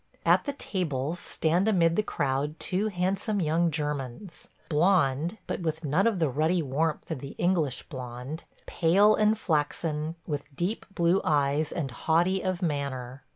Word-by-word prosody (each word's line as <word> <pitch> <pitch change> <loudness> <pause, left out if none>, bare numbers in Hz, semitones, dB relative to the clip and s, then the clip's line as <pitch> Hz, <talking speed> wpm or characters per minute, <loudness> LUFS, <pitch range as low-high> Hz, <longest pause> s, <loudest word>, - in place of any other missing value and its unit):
At - - +4
the 285 - -2
tables 165 - -2
stand 170 +6 +1
amid 170 -6 +3
the 215 - +3
crowd 145 -5 -2
two 195 +4 -1
handsome 195 +2 0
young 165 0 +2
Germans 150 - -4
– - - -34
blond, 165 0 +2
but - - -3
with 160 -2 -3
none 160 +9 +2
of 225 -4 +1
the 165 -3 +2
ruddy 155 +6 +1
warmth 150 +5 -1
of 155 - -2
the 140 +1 -8
English 165 -8 +1
blond; 125 +2 -7 0.2
pale 195 +6 +4
and 215 +1 +3
flaxen, 155 -2 -1
with 145 -2 -5
deep 180 +9 -2
blue 170 +3 +3
eyes 145 0 +1
and 140 -6 -3
haughty 175 +8 +1
of 185 0 -2
manner. 140 -4 -3
160 Hz, 155 wpm, -28 LUFS, 145-185 Hz, 0.2 s, At